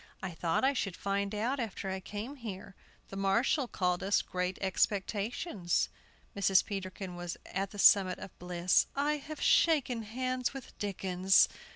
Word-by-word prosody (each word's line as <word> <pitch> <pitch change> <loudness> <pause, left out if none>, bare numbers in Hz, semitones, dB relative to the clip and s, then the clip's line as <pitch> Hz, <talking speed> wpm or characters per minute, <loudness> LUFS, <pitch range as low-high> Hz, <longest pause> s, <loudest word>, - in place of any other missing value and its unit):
"I 190 - -3
thought 165 +3 -1
I 270 +1 +4
should 195 -8 -2
find 200 +1 -1
out 245 +6 -1
after 215 -4 -4
I 190 - -3
came 210 +9 -6
here. 200 -6 -7 0.4
The - - -8
marshal 215 +8 +2
called 180 -5 0
us 200 +1 +2
'Great 180 +1 -2
Expectations.'" 200 - 0 0.5
Mrs. 195 -2 +4
Peterkin 190 -2 -5
was 175 -1 -5
at 195 +1 -3
the 205 - -11
summit 195 -2 +6
of - - -10
bliss. 180 0 +2
"I 295 +2 +1
have 300 +2 -8
shaken 275 -8 +3
hands 255 +4 -2
with 270 - -9
Dickens!" 190 -1 +3
200 Hz, 155 wpm, -32 LUFS, 185-240 Hz, 0.5 s, summit